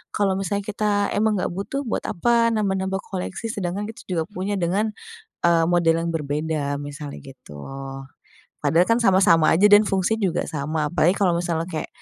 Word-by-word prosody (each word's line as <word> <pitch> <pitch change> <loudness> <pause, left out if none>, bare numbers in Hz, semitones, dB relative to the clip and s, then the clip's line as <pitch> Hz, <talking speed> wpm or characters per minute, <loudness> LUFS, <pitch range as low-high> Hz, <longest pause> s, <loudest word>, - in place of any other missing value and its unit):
kalau 195 -2 +1
misalnya 200 +2 -2
kita 205 0 0
emang 215 0 +2
nggak - - -2
butuh, 200 +10 -4
buat 235 - -3
apa 235 +5 +2
nambah-nambah 190 -2 -1
koleksi, 195 +3 -5
sedangkan 195 0 -3
kita 225 +2 -9
juga 170 -4 -1
punya 200 +1 -3
dengan, 195 +4 0 0.6
eee, 170 -1 +4
model 170 -2 +3
yang 170 - -2
berbeda 150 -1 -2
misalnya, 145 0 -7
gitu. 125 - -12 1.0
Padahal 170 +2 +3
kan 230 +5 +2
sama 195 -4 +4
sama 165 -2 +5
aja 205 +5 +5
dan 205 0 +7
fungsi 195 +3 0
juga 185 -5 0
sama, 150 0 -2
apalagi 175 +2 +3
kalau 190 -4 +2
misalnya 170 -2 -1
kayak, 160 - -4
185 Hz, 170 wpm, -23 LUFS, 165-205 Hz, 1.0 s, dan